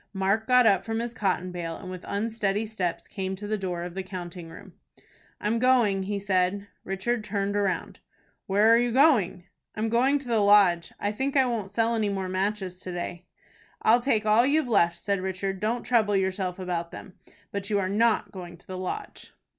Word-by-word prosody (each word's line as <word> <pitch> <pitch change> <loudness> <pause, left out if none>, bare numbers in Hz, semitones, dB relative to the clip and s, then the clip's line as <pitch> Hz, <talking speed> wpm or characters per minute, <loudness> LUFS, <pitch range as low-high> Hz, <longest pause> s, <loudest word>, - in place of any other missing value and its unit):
Mark 195 +3 0
got 250 -1 +5
up 195 -3 +4
from 225 +1 -3
his 235 +1 -3
cotton 185 -5 -1
bale, 170 -2 -4
and 185 -2 -8
with 185 -1 -8
unsteady 210 0 -1
steps 190 -6 -3
came 190 -2 -4
to 205 +2 -8
the 215 +1 -1
door 180 -4 -3
of 175 0 -6
the 190 - -3
counting 180 -2 -8
room. 180 +3 -12 0.7
"I'm 220 +3 0
going," 235 -6 +3
he 200 +2 -2
said. 195 0 0 0.2
Richard 210 +5 -2
turned 200 -1 -2
round. 200 -2 -1 0.5
"Where 205 +3 +3
are - - +6
you 240 0 +1
going?" 245 - +3 0.3
"I'm 220 +1 -1
going 255 +5 +3
to 275 -3 -9
the 230 -2 +2
Lodge. 200 -4 +4
I 205 - -1
think 270 +6 -1
I 265 - +5
won't 225 -5 -2
sell 225 +3 +1
any 220 -3 0
more 190 -2 -3
matches 190 -1 -2
to 185 - -7
day." 175 0 -6 0.6
"I'll 235 +2 +5
take 225 -4 +1
all 215 +2 +5
you've 285 +2 +2
left," 170 -7 +3
said 200 +1 -1
Richard. 190 +1 -3
"Don't 230 +4 -1
trouble 220 -4 +2
yourself 190 -1 -1
about 175 -2 -3
them. 185 - -10 0.4
But 200 0 -4
you 205 - +1
are 190 -2 0
not 220 +4 +1
going 175 -3 -9
to 175 - -18
the 185 -1 -6
Lodge." 405 - -6
200 Hz, 200 wpm, -26 LUFS, 185-225 Hz, 0.7 s, are